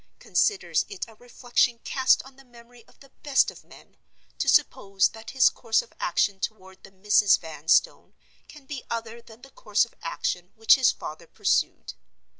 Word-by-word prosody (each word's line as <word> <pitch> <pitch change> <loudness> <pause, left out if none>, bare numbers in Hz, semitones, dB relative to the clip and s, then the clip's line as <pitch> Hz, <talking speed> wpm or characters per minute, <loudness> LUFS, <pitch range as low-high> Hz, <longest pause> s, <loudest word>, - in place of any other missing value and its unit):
Considers 415 -3 0
it 400 -3 -6
a 225 - -16
reflection 245 +1 -1
cast 260 -1 +2
on 265 0 -16
the 270 - -18
memory 240 -1 -18
of - - -25
the 275 -1 -18
best 285 -2 +2
of - - -16
men, - - -19 0.4
to - - 0
suppose 195 0 +2
that 225 0 -12
his 265 -1 +4
course 225 -2 0
of - - -21
action 190 +2 0
toward 190 -2 -7
the - - -13
Misses 200 0 +3
Vanstone 160 - 0 0.3
can 300 -3 -15
be 275 -2 -7
other 230 0 -5
than 230 0 -17
the 270 - -14
course 210 -2 0
of 235 - -22
action 175 +2 -4
which 225 0 +5
his 260 -3 +4
father 155 +2 -9
pursued. - - -1
230 Hz, 175 wpm, -25 LUFS, 195-260 Hz, 0.4 s, which